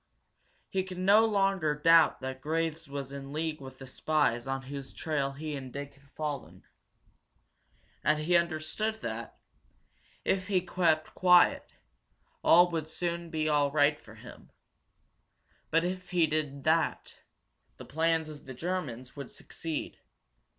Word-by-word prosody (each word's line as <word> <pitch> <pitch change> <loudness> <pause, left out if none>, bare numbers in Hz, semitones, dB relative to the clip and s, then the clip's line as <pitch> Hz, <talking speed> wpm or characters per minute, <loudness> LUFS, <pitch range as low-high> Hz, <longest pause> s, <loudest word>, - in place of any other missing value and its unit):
He 190 - 0
could 185 -1 -8
no 200 +4 +5
longer 195 -7 +1
doubt 165 +1 +5
that 130 0 -5
Graves 160 0 -2
was 140 -1 -5
in 140 0 -7
league 155 0 -3
with 130 -1 -10
the 135 - -10
spies 135 -3 0
on 135 0 -2
whose 135 0 -7
trail 145 -4 -1
he 150 +1 -5
and 130 -2 -7
Dick 140 +1 -6
had 140 0 -24
fallen. 150 -1 -5 1.4
And 150 +2 +3
he 160 +4 +1
understood 170 +6 0
that, - - -5 0.9
if 185 -1 0
he 195 -3 +3
kept 170 -3 +1
quiet, 180 -1 +4 0.7
all 175 +1 +6
would 160 -2 -3
soon 170 0 -3
be 155 -1 -1
all 145 -2 +3
right 150 0 +3
for - - -14
him. - - -13 1.2
But 165 +1 +3
if 180 0 -4
he 175 -2 +3
did 150 -3 -2
that, 160 +2 +1 0.6
the - - -10
plans 160 +1 +1
of 150 -3 -11
the 130 - -7
Germans 130 -6 -4
would 140 -3 -7
succeed. 160 -2 -6
155 Hz, 145 wpm, -30 LUFS, 140-170 Hz, 1.4 s, all